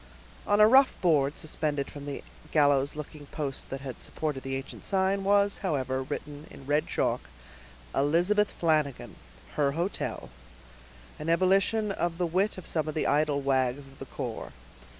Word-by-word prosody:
On 205 Hz, 0 st, +3 dB
a 210 Hz, -, +9 dB
rough 265 Hz, +4 st, +5 dB
board 150 Hz, -5 st, +2 dB
suspended 150 Hz, -3 st, -2 dB
from 145 Hz, -1 st, -8 dB
the 140 Hz, -, -5 dB, 0.3 s
gallows 145 Hz, -2 st, +3 dB
looking 150 Hz, -1 st, -8 dB
post 140 Hz, -3 st, -4 dB
that 135 Hz, 0 st, -5 dB
had 135 Hz, -2 st, -7 dB
supported 150 Hz, -4 st, -3 dB
the 135 Hz, 0 st, -3 dB
ancient 135 Hz, +1 st, -7 dB
sign, 195 Hz, 0 st, +1 dB
was, 200 Hz, +1 st, +3 dB
however, 130 Hz, -8 st, -1 dB
written 145 Hz, +2 st, -6 dB
in 135 Hz, -, -12 dB
red 145 Hz, +2 st, +1 dB
chalk, -, -, -1 dB, 0.6 s
"Elizabeth 175 Hz, +9 st, +3 dB
Flanagan, 155 Hz, -5 st, 0 dB, 0.4 s
her 140 Hz, -2 st, +2 dB
hotel," 170 Hz, -, -3 dB, 0.9 s
an 155 Hz, -, -3 dB
ebullition 195 Hz, +5 st, +3 dB
of 175 Hz, -3 st, -1 dB
the 180 Hz, -, +1 dB
wit 185 Hz, +5 st, +1 dB
of 185 Hz, -, -8 dB
some 155 Hz, -2 st, -1 dB
of 155 Hz, -, -4 dB
the 155 Hz, -, 0 dB
idle 145 Hz, -1 st, +2 dB
wags 135 Hz, 0 st, 0 dB
of 135 Hz, -, -18 dB
the -, -, -6 dB
corps. -, -, -5 dB
150 Hz, 160 wpm, -28 LUFS, 140-185 Hz, 0.9 s, a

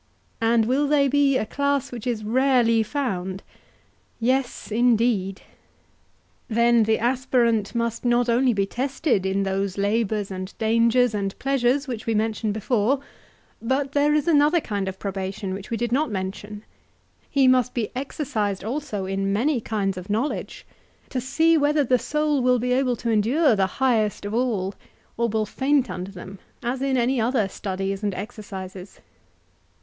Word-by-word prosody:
And 225 Hz, 0 st, +3 dB
will 270 Hz, +5 st, +1 dB
they 285 Hz, -1 st, +3 dB
be 275 Hz, -1 st, +3 dB
a -, -, -1 dB
class 280 Hz, +3 st, -1 dB
which 240 Hz, -1 st, -6 dB
is 230 Hz, -3 st, -2 dB
rarely 240 Hz, -1 st, +3 dB
found? 195 Hz, -7 st, -3 dB, 0.8 s
Yes, 255 Hz, 0 st, -1 dB
indeed. 225 Hz, -4 st, +1 dB, 1.0 s
Then 235 Hz, 0 st, +3 dB
the 220 Hz, +1 st, +2 dB
aspirant 240 Hz, -3 st, +1 dB
must 235 Hz, -1 st, -1 dB
not 240 Hz, 0 st, +2 dB
only 245 Hz, +2 st, +3 dB
be 200 Hz, -3 st, +1 dB
tested 255 Hz, -, -1 dB
in 195 Hz, +1 st, 0 dB
those 195 Hz, 0 st, -2 dB
labours 205 Hz, 0 st, 0 dB
and 185 Hz, +1 st, -6 dB
dangers 230 Hz, +2 st, +3 dB
and 195 Hz, -2 st, -3 dB
pleasures 275 Hz, +1 st, +1 dB
which 235 Hz, -4 st, -5 dB
we 225 Hz, -, +1 dB
mentioned 220 Hz, 0 st, 0 dB
before, 220 Hz, +4 st, +1 dB, 0.6 s
but 265 Hz, +4 st, -1 dB
there 290 Hz, +1 st, +2 dB
is 300 Hz, 0 st, 0 dB
another 305 Hz, +1 st, +4 dB
kind 200 Hz, -9 st, -3 dB
of 190 Hz, 0 st, -4 dB
probation 195 Hz, 0 st, -4 dB
which 195 Hz, +1 st, -7 dB
we 230 Hz, -, -2 dB
did 240 Hz, 0 st, -2 dB
not 285 Hz, +4 st, +1 dB
mention—he 210 Hz, +7 st, -4 dB
must 255 Hz, -1 st, +3 dB
be 230 Hz, -4 st, -2 dB
exercised 230 Hz, -8 st, -2 dB
also 220 Hz, -4 st, -3 dB
in 195 Hz, +1 st, -1 dB
many 245 Hz, +5 st, +1 dB
kinds 200 Hz, -4 st, -2 dB
of 180 Hz, +3 st, -11 dB
knowledge, 225 Hz, +8 st, -2 dB, 0.4 s
to 255 Hz, -, -2 dB
see 320 Hz, +5 st, +3 dB
whether 295 Hz, +1 st, +2 dB
the 250 Hz, -1 st, +2 dB
soul 300 Hz, 0 st, 0 dB
will 250 Hz, 0 st, +3 dB
be 250 Hz, +1 st, -1 dB
able 255 Hz, -1 st, +1 dB
to 230 Hz, +1 st, -2 dB
endure 235 Hz, +6 st, +3 dB
the 195 Hz, -2 st, +2 dB
highest 225 Hz, -6 st, +1 dB
of 205 Hz, -, -4 dB
all, 220 Hz, -6 st, 0 dB, 0.4 s
or 235 Hz, 0 st, 0 dB
will 220 Hz, 0 st, 0 dB
faint 265 Hz, +3 st, +1 dB
under 180 Hz, +1 st, -5 dB
them, 190 Hz, 0 st, -10 dB, 0.2 s
as 250 Hz, +2 st, -2 dB
in 270 Hz, -1 st, +1 dB
any 245 Hz, 0 st, +1 dB
other 230 Hz, -3 st, +1 dB
studies 195 Hz, 0 st, -4 dB
and 205 Hz, -3 st, -2 dB
exercises. 190 Hz, -2 st, -8 dB
230 Hz, 155 wpm, -24 LUFS, 205-260 Hz, 1.0 s, another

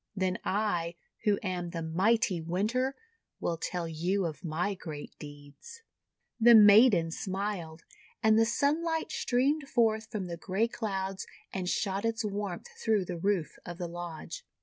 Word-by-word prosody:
Then 185 Hz, -1 st, 0 dB
I, 175 Hz, -5 st, 0 dB, 0.3 s
who 205 Hz, -1 st, +4 dB
am 180 Hz, -3 st, -2 dB
the 170 Hz, -1 st, -4 dB
mighty 190 Hz, +2 st, +2 dB
Winter, 215 Hz, +11 st, 0 dB, 0.4 s
will 165 Hz, -, -1 dB
tell 175 Hz, 0 st, -3 dB
you 175 Hz, +4 st, 0 dB
of 155 Hz, -4 st, -5 dB
my 175 Hz, +5 st, -1 dB
great 155 Hz, -6 st, -8 dB
deeds." 145 Hz, -, -12 dB, 0.6 s
The 235 Hz, +1 st, +8 dB
maiden 205 Hz, -5 st, +7 dB
smiled, 185 Hz, -4 st, -4 dB, 0.4 s
and 220 Hz, 0 st, +5 dB
the 225 Hz, 0 st, +4 dB
sunlight 320 Hz, +6 st, 0 dB
streamed 275 Hz, +3 st, +1 dB
forth 220 Hz, -2 st, +2 dB
from 210 Hz, -5 st, -3 dB
the 170 Hz, -1 st, -5 dB
grey 195 Hz, +6 st, 0 dB
clouds 195 Hz, -5 st, -3 dB, 0.3 s
and 185 Hz, -2 st, -2 dB
shot 195 Hz, 0 st, -1 dB
its 230 Hz, 0 st, -1 dB
warmth 200 Hz, -3 st, -3 dB, 0.2 s
through 215 Hz, -4 st, +2 dB
the 180 Hz, -1 st, -4 dB
roof 190 Hz, -3 st, -1 dB
of 175 Hz, -1 st, -7 dB
the 175 Hz, -1 st, -3 dB
lodge. 175 Hz, -, -7 dB
195 Hz, 150 wpm, -30 LUFS, 170-220 Hz, 0.6 s, The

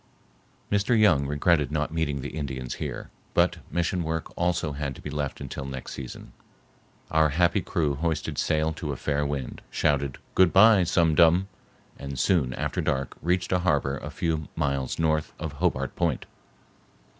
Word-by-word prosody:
Mr. 105 Hz, +3 st, +3 dB
Young 75 Hz, -10 st, +4 dB
regretted 75 Hz, +1 st, +2 dB
not 75 Hz, 0 st, -1 dB
meeting 75 Hz, -4 st, -1 dB
the -, -, -6 dB
Indians 65 Hz, -5 st, -4 dB
here, -, -, -5 dB, 0.2 s
but -, -, +3 dB
mission 85 Hz, +1 st, 0 dB
work 80 Hz, 0 st, -3 dB
also 85 Hz, -3 st, 0 dB
had 70 Hz, -2 st, -4 dB
to -, -, -12 dB
be 75 Hz, -, -6 dB
left 75 Hz, -2 st, -3 dB
until 70 Hz, 0 st, -6 dB
next 65 Hz, -1 st, -6 dB
season. 65 Hz, -3 st, -8 dB, 0.8 s
Our 80 Hz, 0 st, +4 dB
happy 85 Hz, +3 st, +2 dB
crew 75 Hz, -3 st, 0 dB
hoisted 80 Hz, +2 st, -2 dB
sail 80 Hz, +1 st, +1 dB
to 75 Hz, -2 st, -4 dB
a -, -, -6 dB
fair 75 Hz, +1 st, 0 dB
wind, 70 Hz, -3 st, -4 dB
shouted 70 Hz, -3 st, 0 dB, 0.2 s
"Good 95 Hz, -2 st, +5 dB
bye, 100 Hz, -1 st, +7 dB
Sum 85 Hz, -2 st, +3 dB
Dum!" 85 Hz, +5 st, +4 dB, 0.5 s
and 70 Hz, -1 st, -6 dB
soon 65 Hz, -6 st, +2 dB
after -, -, -2 dB
dark 65 Hz, 0 st, -1 dB
reached 90 Hz, +2 st, 0 dB
a 90 Hz, -, +3 dB
harbor 70 Hz, -6 st, +1 dB
a -, -, -7 dB
few 80 Hz, -3 st, -2 dB
miles 70 Hz, -4 st, -1 dB
north 80 Hz, -1 st, 0 dB
of 80 Hz, -2 st, -4 dB
Hobart 70 Hz, -7 st, 0 dB
Point. -, -, 0 dB
75 Hz, 165 wpm, -26 LUFS, 70-85 Hz, 0.8 s, bye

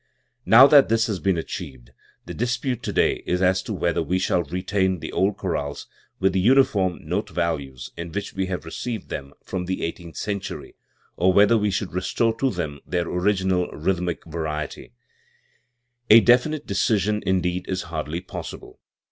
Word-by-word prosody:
Now 120 Hz, +4 st, +9 dB
that 140 Hz, -1 st, +6 dB
this 115 Hz, 0 st, +3 dB
has 105 Hz, -6 st, -2 dB
been 95 Hz, -2 st, +1 dB
achieved, 70 Hz, -7 st, -7 dB, 0.3 s
the -, -, -7 dB
dispute 120 Hz, +1 st, -2 dB
today -, -, +1 dB
is 90 Hz, -, +1 dB
as 95 Hz, 0 st, +3 dB
to 110 Hz, -, -7 dB
whether 85 Hz, -5 st, 0 dB
we 90 Hz, +3 st, 0 dB
shall 90 Hz, -1 st, +1 dB
retain 95 Hz, +3 st, -1 dB
the -, -, -7 dB
old 100 Hz, +1 st, +1 dB
chorales 80 Hz, -8 st, -3 dB, 0.3 s
with 95 Hz, -1 st, +2 dB
the 95 Hz, -, +1 dB
uniform 100 Hz, -5 st, +2 dB
note -, -, -2 dB
values 70 Hz, -7 st, -3 dB
in 85 Hz, 0 st, -6 dB
which 100 Hz, +5 st, -4 dB
we 95 Hz, -1 st, -2 dB
have 90 Hz, -3 st, -4 dB
received 110 Hz, +6 st, -5 dB
them 70 Hz, -1 st, -6 dB
from 90 Hz, -2 st, -4 dB
the 95 Hz, +1 st, -3 dB
eighteenth 85 Hz, 0 st, -6 dB
century, 100 Hz, -2 st, -5 dB, 0.4 s
or 95 Hz, +2 st, +4 dB
whether 100 Hz, +4 st, +5 dB
we 105 Hz, -2 st, +2 dB
should 95 Hz, -1 st, -3 dB
restore 110 Hz, +5 st, 0 dB
to 135 Hz, -, +2 dB
them 80 Hz, -, -4 dB
their 85 Hz, -1 st, -2 dB
original 95 Hz, -1 st, +1 dB
rhythmic 90 Hz, +1 st, -2 dB
variety, 75 Hz, -5 st, -5 dB, 1.2 s
A 110 Hz, -, +10 dB
definite 125 Hz, +6 st, +3 dB
decision, 105 Hz, 0 st, +1 dB
in 95 Hz, 0 st, +1 dB
deed, 90 Hz, +1 st, -2 dB
is 95 Hz, -1 st, -2 dB
hardly 80 Hz, 0 st, -4 dB
possible. 90 Hz, -, -9 dB
95 Hz, 165 wpm, -23 LUFS, 85-105 Hz, 1.2 s, A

